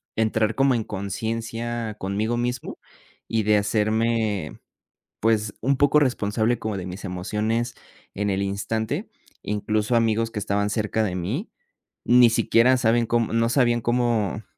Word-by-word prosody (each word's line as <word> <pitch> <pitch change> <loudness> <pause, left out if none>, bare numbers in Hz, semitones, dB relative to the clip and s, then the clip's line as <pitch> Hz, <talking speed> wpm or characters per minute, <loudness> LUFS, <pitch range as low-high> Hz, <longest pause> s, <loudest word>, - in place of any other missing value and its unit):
entrar 110 0 +1
como 135 -1 +3
en 115 - -1
conciencia 115 +3 -4
conmigo 105 +5 -1
mismo, 125 +1 -3 0.5
y 110 -1 0
de 105 0 +4
hacerme, 110 -3 0 0.6
pues, 110 -2 +1
un 135 +4 +1
poco 145 +1 +4
responsable, 115 -3 +1
como 110 -2 -3
de 90 - -6
mis 95 +3 -7
emociones, 105 +6 -2 0.4
en 105 0 -1
el 95 - 0
instante. 100 +3 -2 0.3
Incluso, 105 +2 0
amigos 115 0 +1
que 110 - -5
estaban 100 0 0
cerca 110 0 0
de 95 - -2
mí, 110 - -3 0.6
ni 120 -1 +6
siquiera 115 +2 +4
saben 120 -1 +2
cómo 115 -1 +1
no 115 0 +2
sabían 120 -1 +3
cómo 115 -4 0
110 Hz, 140 wpm, -24 LUFS, 105-120 Hz, 0.6 s, ni